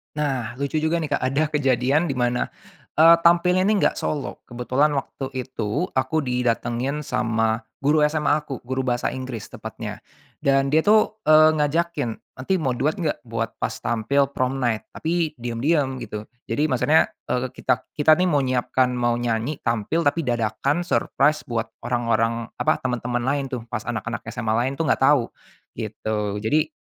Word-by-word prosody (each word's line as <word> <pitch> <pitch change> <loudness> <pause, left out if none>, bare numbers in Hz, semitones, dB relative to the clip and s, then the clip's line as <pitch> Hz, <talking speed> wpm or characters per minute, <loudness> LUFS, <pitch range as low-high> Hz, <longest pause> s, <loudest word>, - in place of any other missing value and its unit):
Nah, 130 -5 -2
lucu 140 +2 -2
juga 160 +2 +1
nih 160 - -2
Kak, - - -4
ada 135 +4 +1
kejadian 140 0 +2
di 170 - -1
mana, 120 0 +1 0.6
eee, 165 +1 +9
tampilnya 180 +2 +4
ini 205 +1 +3
nggak - - +2
solo, 145 -3 -4
kebetulan 130 +5 0
waktu 135 -1 -4
itu 130 - -3
aku 130 +4 +1
didatengin 125 +1 -1
sama 115 -4 0 0.2
guru 150 +2 +3
SMA 150 0 +2
aku, 135 -4 -6
guru 130 +1 -1
bahasa 120 -1 0
Inggris 130 -4 -5
tepatnya. - - -8 0.4
Dan 135 0 +3
dia 155 +3 +3
tuh, 215 0 +4
eee, 155 0 +6
ngajakin, 155 -3 0 0.2
"Nanti 130 +9 -2
mau 130 -6 0
duet 145 +6 0
gak 150 -3 -2
buat 115 -2 -4
pas - - -2
tampil 125 +4 0
prom 130 +1 0
night? 120 -4 0
tapi 165 -1 -1
diam-diam 130 +4 0
gitu." 105 0 -7 0.2
Jadi 150 +2 0
maksudnya, 145 +4 +3 0.2
eee, 125 +1 0
kita 125 - +1 0.2
kita 150 +1 +4
ini 185 - +3
mau 145 -5 +2
nyiapkan, 130 0 +1
mau 120 -1 +1
nyanyi 120 +4 -2
tampil 115 +8 0
tapi 150 0 +1
dadakan 120 +7 0
surprise 150 -3 +1
buat 115 -2 -2 0.2
orang-orang, 115 -1 0
apa, 125 - +3
teman-teman 125 -1 -1
lain 140 +2 0
tuh 125 -3 -5
pas 120 - -1
anak-anak - - -4
SMA 110 -1 -2
lain 125 +3 0
itu 165 - -1
enggak 155 - +1
tahu, 140 -6 +3 0.5
gitu. 105 -1 -3
Jadi, 150 +8 +2
130 Hz, 165 wpm, -23 LUFS, 120-150 Hz, 0.6 s, eee